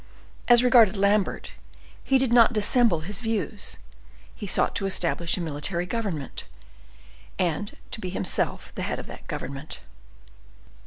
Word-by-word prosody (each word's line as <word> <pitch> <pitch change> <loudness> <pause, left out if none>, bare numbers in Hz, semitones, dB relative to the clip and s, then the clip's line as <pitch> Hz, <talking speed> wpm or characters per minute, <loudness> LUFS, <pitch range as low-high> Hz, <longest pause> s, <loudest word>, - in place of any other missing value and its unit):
As 240 0 +6
regarded 235 -5 +5
Lambert, 200 0 +1 0.5
he 270 - +3
did 260 -2 0
not 240 -1 +6
dissemble 215 -4 +3
his 200 +6 -4
views; 225 -3 -2 0.6
he 205 - -7
sought - - +2
to 195 - -1
establish 170 -2 +1
a - - -3
military 170 +3 -3
government, 180 - -4 0.9
and 180 +4 -2
to 220 - -6
be 185 - -4
himself 180 -1 -2
the - - -5
head - - -2
of - - -7
that - - -11
government. 140 +3 -6
200 Hz, 140 wpm, -25 LUFS, 170-230 Hz, 0.9 s, As